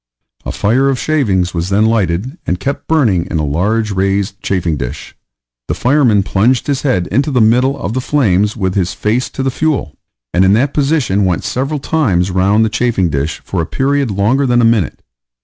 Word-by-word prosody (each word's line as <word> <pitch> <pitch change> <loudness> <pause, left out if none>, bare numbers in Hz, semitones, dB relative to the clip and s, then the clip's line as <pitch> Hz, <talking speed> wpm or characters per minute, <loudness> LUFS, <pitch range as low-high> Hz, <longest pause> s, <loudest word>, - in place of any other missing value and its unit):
A - - -2
fire 125 +7 +1
of 135 - 0
shavings 100 - 0
was 85 +1 -2
then 105 +2 +2
lighted, 110 - 0
and 90 - -1
kept 140 +1 -4
burning 115 - +1
in - - -2
a 75 - -1
large 105 +9 0
raised 100 +1 -1
chafing 90 -4 -1
dish; 60 -4 -6 0.5
the - - -2
fireman 125 -6 +2
plunged 110 +6 +1
his 140 -2 -1
head 125 -11 0
into 140 +3 +1
the 130 -4 +1
middle 125 +5 +3
of 100 - -4
the 130 - -1
flames 105 -7 +1
with 95 -3 -1
his 95 -2 -1
face 115 +4 -1
to 135 - -5
the 135 - 0
fuel, 155 - -2 0.4
and 90 - +3
in 95 +1 +4
that 130 +6 +1
position 140 -9 +1
went 90 -3 0
several 135 +4 -2
times 100 - 0
round 100 +4 +2
the - - +1
chafing 105 -5 0
dish 70 +1 -3
for - - -2
a 80 - -4
period 140 +2 0
longer 110 +8 +1
than 120 -1 +2
a 120 - +4
minute. 110 - 0
110 Hz, 200 wpm, -15 LUFS, 95-130 Hz, 0.5 s, in